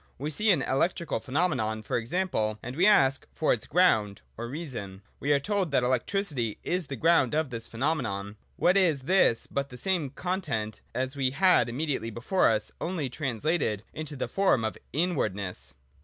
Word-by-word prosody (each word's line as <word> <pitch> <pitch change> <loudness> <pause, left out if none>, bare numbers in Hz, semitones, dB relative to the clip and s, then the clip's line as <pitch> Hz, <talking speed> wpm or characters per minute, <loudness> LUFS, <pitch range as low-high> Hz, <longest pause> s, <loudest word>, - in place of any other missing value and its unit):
We 145 +4 -3
see 210 +9 0
an 165 -9 +4
electrical 170 +5 0
phenomenon, 130 -8 -1
for - - -3
example, 115 - -1
and 125 +2 -6
we 180 +6 +4
ask 135 -10 +4
for 155 - +2
its 110 - -5
ground 110 - +3
(or 120 +1 -5
reason): 120 - -6 0.2
we 145 - 0
are 145 - +5
told 200 +2 -1
that 140 -3 +2
electricity 130 - -1
is 180 -3 -1
the 135 - -4
ground 155 -1 +3
of 155 -4 0
this 115 -1 -5
phenomenon. 115 -7 -2 0.2
What 180 +2 +3
is 165 -8 +3
this 170 -7 +3
but 140 0 -3
the 125 - -10
same 175 -3 0
content 140 - -3
as 130 +2 -2
we 135 -2 +1
had 160 -4 +4
immediately 130 -3 -2
before 120 - +2
us, 110 -1 0
only 165 -7 -2
trans 130 -6 -4
lated 150 - +1
into 155 -1 -5
the 130 - -3
form 190 - +2
of 110 - -2 0.2
inwardness 110 - -2
140 Hz, 175 wpm, -28 LUFS, 115-170 Hz, 0.2 s, are